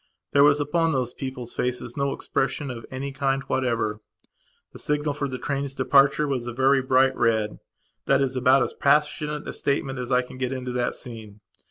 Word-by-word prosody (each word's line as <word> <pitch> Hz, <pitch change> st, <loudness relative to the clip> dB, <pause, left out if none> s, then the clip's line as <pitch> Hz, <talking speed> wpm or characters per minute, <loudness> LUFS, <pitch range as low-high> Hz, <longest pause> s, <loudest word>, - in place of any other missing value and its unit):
There 140 Hz, -, +6 dB
was 145 Hz, 0 st, +5 dB
upon 165 Hz, +2 st, +1 dB
those 125 Hz, -2 st, -1 dB
people's 125 Hz, -3 st, -6 dB
faces 125 Hz, -1 st, -3 dB
no 140 Hz, -1 st, 0 dB
expression 135 Hz, +1 st, -2 dB
of 115 Hz, -2 st, -8 dB
any 135 Hz, +2 st, -5 dB
kind 135 Hz, -1 st, -1 dB
whatever. 120 Hz, -5 st, -1 dB, 0.7 s
The -, -, -10 dB
signal 150 Hz, 0 st, -1 dB
for 140 Hz, 0 st, -2 dB
the 130 Hz, -1 st, -5 dB
train's 140 Hz, +1 st, -3 dB
departure 140 Hz, +3 st, +4 dB
was 130 Hz, -4 st, -2 dB
a 120 Hz, -, -4 dB
very 135 Hz, +2 st, +3 dB
bright 130 Hz, +1 st, +3 dB
red; 110 Hz, -2 st, +1 dB, 0.5 s
that 135 Hz, -, +4 dB
is 135 Hz, -1 st, 0 dB
about 130 Hz, +1 st, +4 dB
as -, -, -3 dB
passionate 150 Hz, +1 st, +1 dB
a -, -, -4 dB
statement 135 Hz, -2 st, -1 dB
as 125 Hz, +1 st, -5 dB
I 125 Hz, 0 st, +3 dB
can 125 Hz, 0 st, -12 dB
get 130 Hz, -1 st, -1 dB
into 130 Hz, -1 st, -4 dB
that 125 Hz, 0 st, -1 dB
scene. 110 Hz, -4 st, -9 dB
130 Hz, 190 wpm, -25 LUFS, 125-140 Hz, 0.7 s, There